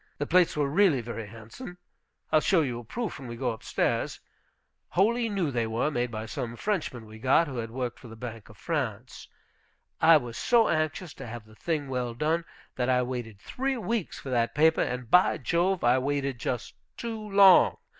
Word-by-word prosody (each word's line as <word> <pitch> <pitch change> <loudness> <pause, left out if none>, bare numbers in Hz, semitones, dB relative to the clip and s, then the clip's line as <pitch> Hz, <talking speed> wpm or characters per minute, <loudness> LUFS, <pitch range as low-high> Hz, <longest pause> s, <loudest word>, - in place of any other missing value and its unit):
The 145 - -2
plates 175 0 +3
were 145 -2 +2
really 160 -1 +3
very 115 -2 -6
handsome. 115 - -10 0.5
I'll 155 - +5
show 180 0 +3
you 125 -5 -2
a - - -9
proof 225 - -5
when 130 - -8
we 120 - -6
go 125 0 -1
up 110 - -8
stairs. - - -1 0.7
Wholly 230 +5 +2
new 190 -8 -1
they 120 -3 -1
were, 115 +7 0
made 125 -3 -1
by 110 -1 -5
some 120 0 -5
Frenchman 155 - -3
we 110 0 -12
got, 135 +7 +3
who 135 -3 -6
had 115 -1 -3
worked 125 0 -4
for 125 - -12
the 110 - -10
Bank 115 -2 -8
of 105 - -15
France. 125 -6 -4 0.7
I 160 0 +8
was 120 -5 -6
so 235 -3 +4
anxious 155 +1 -1
to - - -9
have 115 -1 -8
the 110 - -18
thing 150 +4 -2
well 125 -3 -3
done, 160 +5 0 0.3
that 125 0 0
I 125 -1 +3
waited 120 -5 -5
three 265 - -2
weeks 230 -4 -2
for 135 - -7
that 120 -2 0
paper, 160 +2 +4
and, 125 -1 -2
by 180 +1 +5
Jove, 180 +2 0
I 120 +2 +4
waited 140 -1 -2
just 120 0 -3 0.2
too 225 -2 -5
long. 195 -2 +7
130 Hz, 200 wpm, -28 LUFS, 120-170 Hz, 0.7 s, I